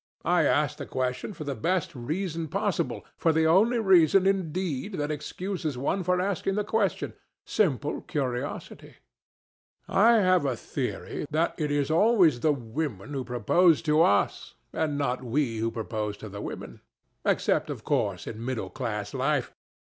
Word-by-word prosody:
"I -, -, +3 dB
asked -, -, +1 dB
the -, -, -6 dB
question 130 Hz, +5 st, -2 dB
for 180 Hz, -6 st, -7 dB
the 140 Hz, -1 st, -3 dB
best 170 Hz, +3 st, -1 dB
reason 160 Hz, +6 st, -3 dB
possible, -, -, -2 dB
for 165 Hz, -, +3 dB
the 160 Hz, 0 st, +2 dB
only 205 Hz, +9 st, +4 dB
reason, 190 Hz, -3 st, +5 dB
indeed, 185 Hz, -2 st, -1 dB
that 150 Hz, -1 st, -2 dB
excuses 155 Hz, 0 st, -4 dB
one 145 Hz, +9 st, 0 dB
for 180 Hz, 0 st, +1 dB
asking 195 Hz, +1 st, -1 dB
any 210 Hz, -, +1 dB
question—simple 195 Hz, -, -1 dB
curiosity. 125 Hz, -4 st, -4 dB, 0.9 s
I 225 Hz, +5 st, +5 dB
have 185 Hz, -6 st, +4 dB
a 135 Hz, -3 st, 0 dB
theory 145 Hz, -, -4 dB
that 160 Hz, +2 st, +1 dB
it 150 Hz, -2 st, 0 dB
is 145 Hz, 0 st, 0 dB
always 175 Hz, -, +4 dB
the 155 Hz, +5 st, +3 dB
women 130 Hz, -2 st, -4 dB
who 135 Hz, -2 st, -2 dB
propose 150 Hz, -, +3 dB
to 155 Hz, 0 st, +3 dB
us, 100 Hz, -9 st, +2 dB, 0.2 s
and 155 Hz, -3 st, -1 dB
not 130 Hz, -3 st, -1 dB
we 125 Hz, -1 st, 0 dB
who 115 Hz, +1 st, 0 dB
propose 110 Hz, -2 st, -4 dB
to 110 Hz, -, -9 dB
the 100 Hz, +1 st, -7 dB
women. -, -, -7 dB, 0.4 s
Except, -, -, +1 dB
of -, -, -6 dB
course, -, -, 0 dB
in 115 Hz, +1 st, -6 dB
middle 130 Hz, -2 st, -3 dB
class 110 Hz, -7 st, -4 dB
life. 135 Hz, 0 st, 0 dB
150 Hz, 155 wpm, -27 LUFS, 125-180 Hz, 0.9 s, reason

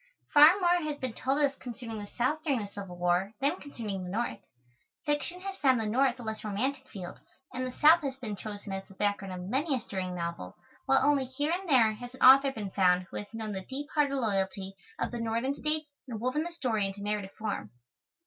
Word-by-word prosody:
Far 300 Hz, +6 st, +8 dB
more 350 Hz, -1 st, +3 dB
has 305 Hz, -2 st, -3 dB
been 255 Hz, -4 st, -3 dB
told 270 Hz, +4 st, 0 dB
us 280 Hz, -, -1 dB
concerning 235 Hz, -2 st, -7 dB
the 205 Hz, -, -7 dB
South 255 Hz, +8 st, -1 dB
during 280 Hz, -6 st, +1 dB
the 205 Hz, -, -5 dB
Civil 195 Hz, -3 st, -7 dB
War 180 Hz, +3 st, +1 dB
than 290 Hz, +7 st, +1 dB
concerning 215 Hz, -9 st, -5 dB
the 180 Hz, -, -6 dB
North. 230 Hz, +6 st, -2 dB, 0.7 s
Fiction 300 Hz, +5 st, -1 dB
has 390 Hz, 0 st, -5 dB
found 260 Hz, -4 st, +4 dB
the 220 Hz, -, -1 dB
North 250 Hz, +3 st, +2 dB
a -, -, -7 dB
less 220 Hz, -1 st, -4 dB
romantic 260 Hz, +6 st, -2 dB
field, 190 Hz, -8 st, -8 dB, 0.3 s
and 255 Hz, 0 st, -2 dB
the -, -, -5 dB
South 315 Hz, +6 st, +6 dB
has 275 Hz, -3 st, -3 dB
been 230 Hz, -6 st, -5 dB
chosen 205 Hz, -1 st, -7 dB
as 195 Hz, 0 st, -4 dB
the 195 Hz, -, -16 dB
background 200 Hz, -1 st, -1 dB
of 180 Hz, 0 st, -6 dB
many 275 Hz, -, +1 dB
a -, -, -1 dB
stirring 185 Hz, -4 st, -4 dB
novel, 170 Hz, -, -5 dB, 0.3 s
while 270 Hz, 0 st, +4 dB
only 285 Hz, -2 st, +3 dB
here 290 Hz, +4 st, -2 dB
and 360 Hz, +1 st, -2 dB
there 230 Hz, -6 st, +5 dB
has 245 Hz, +3 st, -9 dB
an -, -, -17 dB
author 270 Hz, +1 st, +8 dB
been 210 Hz, -6 st, -5 dB
found 180 Hz, -2 st, +3 dB
who -, -, -5 dB
has 205 Hz, -, -7 dB
known 220 Hz, -1 st, -5 dB
the 190 Hz, -1 st, -4 dB
deep 275 Hz, +8 st, -6 dB
hearted 290 Hz, -2 st, +2 dB
loyalty 195 Hz, -5 st, -1 dB, 0.2 s
of -, -, -2 dB
the 240 Hz, -, -4 dB
Northern 230 Hz, +4 st, 0 dB
States 305 Hz, +1 st, -1 dB, 0.2 s
and 230 Hz, -4 st, -5 dB
woven 255 Hz, +6 st, 0 dB
the 345 Hz, +2 st, -4 dB
story 240 Hz, -11 st, 0 dB
into 200 Hz, +1 st, -7 dB
narrative 205 Hz, -2 st, -2 dB
form. 205 Hz, -, -3 dB
240 Hz, 225 wpm, -30 LUFS, 200-280 Hz, 0.7 s, Far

